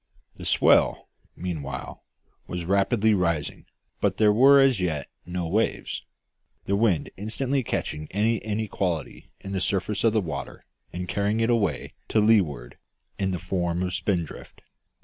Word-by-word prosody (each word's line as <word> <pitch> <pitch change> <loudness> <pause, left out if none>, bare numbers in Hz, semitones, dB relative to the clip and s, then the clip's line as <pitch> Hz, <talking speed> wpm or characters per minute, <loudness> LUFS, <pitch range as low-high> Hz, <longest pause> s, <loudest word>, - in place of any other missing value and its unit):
The - - -8
swell, - - +3 0.3
meanwhile, 75 -7 -5 0.4
was 90 -1 -4
rapidly 100 +4 +2
rising, 85 -6 -1 0.3
but - - 0
there 105 -1 +5
were 135 +5 +7
as 135 -5 +4
yet 80 -6 -1 0.2
no 90 -1 -3
waves, 105 +7 -1 0.6
the 100 - +1
wind 100 -6 +1
instantly 130 +7 -1
catching 75 -9 -3
any 110 +4 +1
inequality 100 -8 -3
in 95 - -7
the 95 -2 -2
surface 100 +2 -1
of 115 -2 +4
the 110 - +3
water 75 -8 -6 0.3
and 90 +1 -5
carrying 100 +4 0
it 115 +1 +2
away 100 -10 0
to 110 - +2
leeward 95 - +2 0.4
in 95 -1 0
the 90 - -1
form 90 -1 -2
of 90 0 -2
spindrift. 85 -3 -3
95 Hz, 145 wpm, -25 LUFS, 85-110 Hz, 0.6 s, were